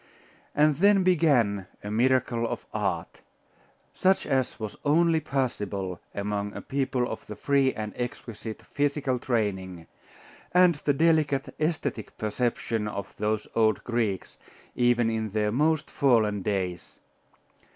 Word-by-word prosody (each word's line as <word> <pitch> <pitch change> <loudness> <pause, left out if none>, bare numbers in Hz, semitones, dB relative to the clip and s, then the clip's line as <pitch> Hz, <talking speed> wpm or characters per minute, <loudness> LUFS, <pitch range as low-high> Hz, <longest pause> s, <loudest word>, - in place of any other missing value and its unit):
And 150 -1 +4
then 200 +2 +5
began 130 - +3 0.2
a 105 - -5
miracle 120 0 +2
of - - -5
art, 95 -6 -2 0.7
such 190 +1 +2
as 130 -2 0
was 110 -2 -5
only 160 +2 +3
possible 105 - -2 0.2
among 105 0 -2
a - - -5
people 130 -2 -1
of 110 - -7
the 105 - -6
free 135 +4 +2
and 105 -2 -5
exquisite 115 -2 -6
physical 140 -3 -1
training, 95 -8 -2 0.7
and 180 -1 +7
the 145 - +4
delicate 150 -2 +2
aesthetic 155 -8 -2
perception 110 0 -1
of 100 -2 -5
those 105 0 -1
old 110 -1 +2
Greeks, 115 -6 -2 0.4
even 120 -2 +2
in 110 -1 -2
their 105 -1 +1
most 155 +5 +1
fallen 110 -7 +2
days. 95 -3 -3
120 Hz, 125 wpm, -27 LUFS, 105-140 Hz, 0.7 s, and